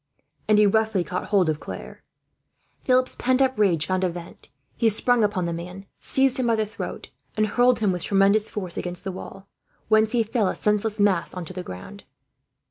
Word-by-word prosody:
And 215 - +4
he 210 - +6
roughly 220 -2 +2
caught 180 +1 -4
hold 195 -4 +2
of 155 -1 -1
Claire. - - -9 0.8
Philip's 255 0 +2
pent 255 +1 +1
up 260 -4 +1
rage 170 -7 +3
found 185 +2 -1
a 185 - +2
vent. 170 0 -10 0.3
He 230 - +3
sprang 235 +2 +3
upon 200 -4 0
the 170 - -2
man, 180 +3 -8
seized 265 0 +1
him 255 -2 0
by 230 - +3
the 220 -1 0
throat, 215 - -7 0.3
and 215 - +3
hurled 245 +2 +2
him 205 -3 +2
with 180 -2 -3
tremendous 200 +2 +3
force 185 -5 -6
against 175 -1 -4
the 195 - -3
wall; 195 +1 -10 0.4
whence 220 +1 +3
he 235 -2 +3
fell, 220 -2 0
a - - -1
senseless 210 +1 0
mass, 195 -4 +1
on 180 -2 -5
to 185 - -9
the 185 - -5
ground. 95 - -10
205 Hz, 205 wpm, -24 LUFS, 180-220 Hz, 0.8 s, he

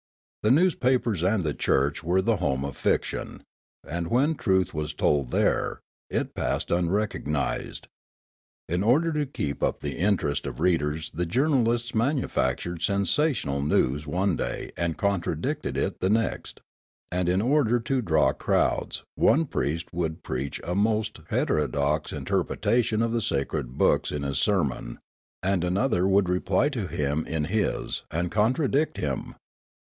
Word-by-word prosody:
The 105 - +2
newspapers 130 - +2
and 95 +2 +2
the 75 -2 -1
church 70 +4 +1
were 90 +3 +2
the 115 +1 +2
home 70 -6 0
of 70 - -5
fiction; - - -1 0.4
and 85 +1 -3
when 135 - +2
truth 95 - +1
was 75 -1 -3
told 70 -4 +1
there, - - +1 0.3
it - - -2
passed - - -2
unrecognised. 90 +5 -1 0.8
In 90 +2 0
order 150 +10 +3
to 150 -2 0
keep 75 - -4
up - - 0
the - - -4
interest 85 -7 +1
of - - -6
readers 80 -3 0
the 85 +2 -2
journalists 120 - +1
manufactured 100 - 0
sensational 100 - +1
news 75 0 +1
one 90 +3 +1
da}' - - -4
and 85 -2 -1
contradicted 100 -3 -1
it - - -1
the 95 - +1
next; 115 +2 -1 0.5
and 90 0 0
in 90 +1 +2
order 120 0 +3
to 130 +3 0
draw 80 - +3
crowds - - 0
one 165 +2 +3
priest 80 - -2
would 80 0 -3
preach 65 +2 -3
a 85 - -2
most 110 +1 0
hetero 75 -1 +1
dox 70 +2 -1
interpretation 115 -2 0
of 115 - 0
the 115 0 0
sacred 70 - -2
books - - +2
in 75 -1 -3
his 70 0 -1
sermon 70 - 0 0.5
and 95 -1 +1
another 95 +1 +1
would 100 -1 +3
reply 90 +8 +1
to 115 -10 -3
him 75 -1 -1
in 80 -1 -1
his 105 +7 -1
and 85 +2 -2
contradict 135 +7 +1
him. 70 -3 -3
90 Hz, 145 wpm, -26 LUFS, 75-115 Hz, 0.8 s, order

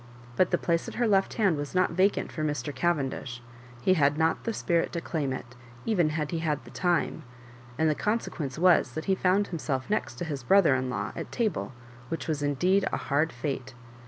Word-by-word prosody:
But 185 - +3
the - - +2
place 170 -1 0
at - - -7
her 240 -1 +1
left 195 -2 +2
hand 195 -8 +2
was 145 +4 -5
not 185 -2 +3
left 165 - -8
vacant 195 +2 +2
for 155 - -4
Mr. 145 -2 -2
Cavendish; 135 -7 -1 0.4
he 185 - +5
had 145 -4 +3
not 160 0 +1
the 230 - 0
spirit 170 -6 0
to 170 - -1
claim 155 -5 -2
it, 125 -1 -6 0.3
even 180 -8 +2
had 155 -1 -2
he 165 - -1
had 155 -3 -1
the - - -12
time; 175 -2 0 0.6
and 160 - +2
the 155 - +3
consequence 155 - -2
was 170 -7 +4
that 155 - -4
he 195 - +3
found 190 +2 +2
himself 145 -3 -3
next 215 - -1
to 175 - -4
his 145 -4 -4
brother 170 +3 +5
in 130 0 0
law 105 -4 -3
at - - -6
table, 220 - -1 0.4
which 165 - -4
was 155 -3 -1
indeed 180 +8 +2
a - - 0
hard 150 +3 0
fate. 130 0 -4
160 Hz, 215 wpm, -28 LUFS, 140-185 Hz, 0.6 s, he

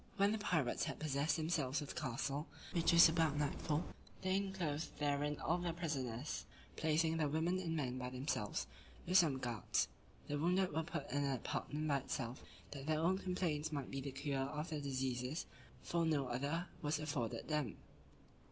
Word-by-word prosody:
When 200 0 +5
the 220 - 0
pirates 160 -11 +1
had - - -3
possessed 150 +1 +1
themselves 155 -4 +1
of 145 - -5
the - - -4
castle, 140 +4 -1 0.2
which 170 -2 +3
was 170 0 +10
about 160 -3 +2
nightfall, 150 +2 0 0.4
they 185 0 +2
enclosed 185 -6 -1
therein 145 0 0
all 180 - +1
the 175 -1 -1
prisoners, 145 -5 -2 0.3
placing 160 +1 +2
the 150 -2 +2
women 165 +5 +1
and 165 -3 -1
men 130 -4 -1
by 125 0 -3
themselves, 125 -5 -1 0.4
with 185 +2 +6
some 155 -7 +4
guards. 120 -4 0 0.4
The 145 0 -1
wounded 180 +4 +3
were 160 - +2
put 165 - -4
in 145 0 +1
an 140 - +1
apartment 150 +4 -2
by 140 -2 +3
themselves, 130 -2 -3 0.3
that 140 0 -6
their 155 -1 +3
own 185 +4 +3
complaints 170 -5 -1
might 140 -4 -3
be 135 - -2
the 140 - -3
cure 140 0 -1
of 150 +4 -3
their 150 -2 -2
diseases; 130 +1 -1 0.4
for 170 -1 +1
no 145 -5 +2
other 140 +8 -1 0.2
was 150 0 +1
afforded 145 -7 -2
them. 150 -7 0
150 Hz, 180 wpm, -39 LUFS, 135-165 Hz, 0.4 s, was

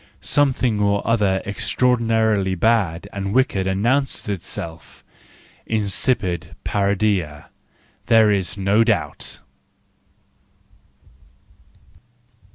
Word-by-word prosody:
Something 130 -6 +1
or 100 0 0
other 105 -4 +1
extraordinarily 110 -3 +1
bad 95 -4 +1
and 100 +1 -3
wicked 100 -8 +1
announces 120 +8 0
itself: 85 -3 -6 0.7
incipitparodia,, 100 - -1 0.6
there 110 -2 +5
is 100 -1 -1
no 100 +3 +3
doubt 105 -11 -2
105 Hz, 65 wpm, -21 LUFS, 95-115 Hz, 0.7 s, there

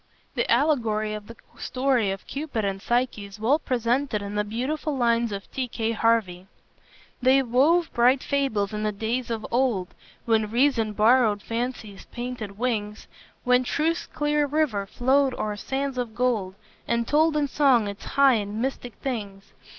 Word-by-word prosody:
The 240 - -1
allegory 230 -6 +1
of 210 -1 -7
the 230 - -10 0.2
story 255 -5 +1
of 195 0 -5
Cupid 280 -7 -3
and 195 -1 -3
Psyche 240 -3 0
is 200 +1 -12
well 260 +8 +2
presented 250 -2 0
in 200 0 -6
the 210 0 0
beautiful 270 +7 -3
lines 235 -2 +2
of 200 0 -5
T. 260 -1 -2
K. 225 -1 -2
Harvey: 220 -5 +1 0.7
"They 265 +2 +4
wove 290 +8 +2
bright 250 +2 +3
fables 220 -8 0
in 210 - -3
the 215 0 0
days 225 +4 -3
of 225 -2 -3
old, 235 -8 +1 0.4
When 220 -2 +2
reason 235 -2 +2
borrowed 215 -1 +3
fancy's 230 -3 -4
painted 240 -5 -6
wings; 215 -3 -2 0.4
When 250 0 +3
truth's 320 +6 -1
clear 295 0 0
river 275 -10 0
flowed 265 +4 +2
o'er 210 -1 -3
sands 265 +4 -3
of 230 -3 -4
gold, 230 -7 0 0.3
And 235 0 0
told 310 +1 +3
in 290 -1 +1
song 260 -6 +3
its 200 +1 -7
high 275 -1 +4
and 205 +2 -5
mystic 245 -3 -3
things! 205 -7 -5
235 Hz, 160 wpm, -25 LUFS, 215-265 Hz, 0.7 s, They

